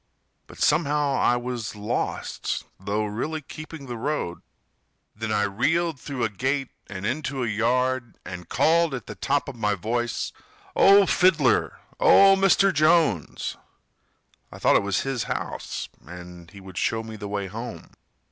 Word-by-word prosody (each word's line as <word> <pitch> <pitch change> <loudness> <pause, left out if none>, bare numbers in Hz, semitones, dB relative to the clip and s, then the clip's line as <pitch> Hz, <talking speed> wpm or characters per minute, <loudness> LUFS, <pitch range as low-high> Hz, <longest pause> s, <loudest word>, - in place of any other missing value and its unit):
But - - -14
somehow 145 -1 +2
I 125 -2 +3
was 120 -3 -4
lost, 105 0 -3 0.2
Though 100 +3 -1
really 125 +10 -3
keeping 155 0 -9
the 120 -2 -5
road. 115 - -3 0.7
Then 110 +1 -4
I 105 -1 +2
reeled 145 - 0
through 135 -1 -4
a 110 - +2
gate 130 +6 -1 0.2
and 100 -1 -6
into 135 0 -2
a - - -1
yard, 120 +2 0
And 90 -1 -8
called 165 -2 +3
at 125 - -7
the - - -7
top 140 +1 0
of 140 - -6
my 105 -3 0
voice: 120 +4 -2 0.4
"Oh, 200 0 +7
Fiddler! 165 - +3 0.2
Oh, 195 0 +7
Mr. 195 0 +4
Jones!" 155 - +2 0.9
(I - - -10
thought - - +3
it - - +5
was 100 -3 0
his 135 -3 -2
house - - -4 0.2
and 90 0 -11
he 100 - -13
would 95 -1 -7
show 115 0 0
me 110 0 -8
the 105 -1 -6
way 100 -1 -2
home. 115 +6 -7
120 Hz, 155 wpm, -25 LUFS, 105-150 Hz, 0.9 s, Oh